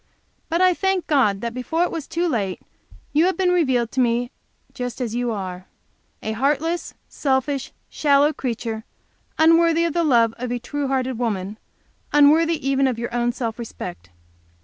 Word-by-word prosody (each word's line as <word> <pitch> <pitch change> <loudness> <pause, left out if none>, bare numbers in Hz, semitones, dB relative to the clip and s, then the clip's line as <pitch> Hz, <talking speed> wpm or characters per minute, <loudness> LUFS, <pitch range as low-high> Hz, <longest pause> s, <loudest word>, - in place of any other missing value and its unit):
But 335 +2 +1
I 370 -1 +5
thank 385 0 0
God 215 -10 +2
that 235 0 -3
before 320 +7 -1
it - - -1
was 325 -4 -5
too 345 +1 -1
late, 200 - -1 0.5
you 310 +3 +4
have 375 -1 +1
been 370 -1 +2
revealed 260 -10 +1
to 265 - -3
me 240 0 +1 0.4
just 245 -1 -5
as 240 -4 -3
you 245 0 -1
are 185 -3 -5 0.6
a 220 - -2
heartless, 295 +8 -1
selfish, 270 0 -1 0.2
shallow 290 0 +3
creature, 230 -4 -4 0.5
unworthy 330 +1 +4
the 340 +2 0
love 235 -7 +3
of 250 0 -3
a 245 - 0
true 285 +4 -3
hearted 260 -2 -1
woman, 210 -3 -2 0.5
unworthy 300 +1 +4
even 275 0 +3
of 250 -3 -1
your 235 0 -4
own 240 0 +1
self 235 -2 -4
respect. 85 - -7
260 Hz, 165 wpm, -22 LUFS, 235-315 Hz, 0.6 s, I